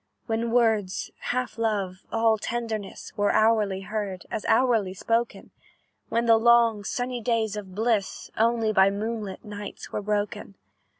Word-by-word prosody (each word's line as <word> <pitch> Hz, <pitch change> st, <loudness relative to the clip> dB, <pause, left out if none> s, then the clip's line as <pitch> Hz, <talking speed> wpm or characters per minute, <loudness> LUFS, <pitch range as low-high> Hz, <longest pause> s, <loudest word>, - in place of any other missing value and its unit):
"When 230 Hz, 0 st, -1 dB
words, 220 Hz, -5 st, +1 dB
half 250 Hz, -3 st, -3 dB
love, 200 Hz, -5 st, -2 dB
all 225 Hz, -1 st, +3 dB
tenderness, 225 Hz, -3 st, -4 dB
Were 205 Hz, 0 st, +2 dB
hourly 215 Hz, -3 st, +2 dB
heard, 195 Hz, -2 st, -4 dB
as 215 Hz, -, -3 dB
hourly 225 Hz, -7 st, +2 dB
spoken, 230 Hz, +4 st, -1 dB, 0.6 s
When 230 Hz, +1 st, +1 dB
the 230 Hz, -1 st, +6 dB
long, 230 Hz, -2 st, +4 dB
sunny 245 Hz, +3 st, -3 dB
days 220 Hz, -2 st, 0 dB
of 195 Hz, -3 st, -7 dB
bliss 220 Hz, -3 st, -1 dB
Only 225 Hz, -1 st, +2 dB
by 190 Hz, -1 st, +6 dB
moonlight 210 Hz, 0 st, -4 dB
nights 205 Hz, -1 st, -8 dB
were -, -, -2 dB
broken. 205 Hz, -1 st, -2 dB
220 Hz, 135 wpm, -26 LUFS, 205-230 Hz, 0.6 s, the